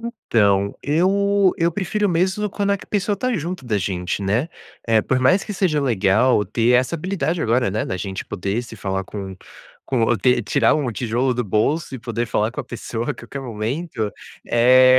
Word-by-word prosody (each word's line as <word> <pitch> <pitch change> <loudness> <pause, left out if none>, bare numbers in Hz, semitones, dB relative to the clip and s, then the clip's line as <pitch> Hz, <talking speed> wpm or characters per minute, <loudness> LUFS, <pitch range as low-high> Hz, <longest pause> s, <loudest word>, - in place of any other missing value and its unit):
Então, 105 - +1
eu 195 +5 +3
eu 170 0 +2
prefiro 205 +3 0
mesmo, 190 +4 +1
quando 200 +1 -1
a 200 - +1
pessoa, 205 0 0
está 255 +6 -1
junto 175 -4 -4
da 110 -3 0
gente, 90 0 -2
né, 110 +10 0 0.6
por 130 - +3
mais 180 +10 +4
que 210 - -5
seja 180 -6 +1
legal, 110 -2 +3
ter 115 +4 +1
essa 125 +6 +2
habilidade 170 -1 -1
agora, 115 -1 +2
né, 105 +3 -1
da 95 - -3
gente 95 +1 -5
poder 100 +4 -3
se 115 -2 -11
falar, 95 -1 -2
com 95 -1 -7 0.5
com 120 -2 +1
ter 125 -1 +3
tirar - - +3
um 140 -6 -1
tijolo 120 +3 0
do 125 - 0
bolso, 135 - 0
e - - -5
poder 120 0 -3
falar 110 0 0
com 150 - -4
a - - -8
pessoa 120 +1 -4
a - - -2
qualquer 120 +3 -8
momento, 115 - -3 0.3
é, 130 +2 +6
125 Hz, 185 wpm, -21 LUFS, 110-170 Hz, 0.6 s, é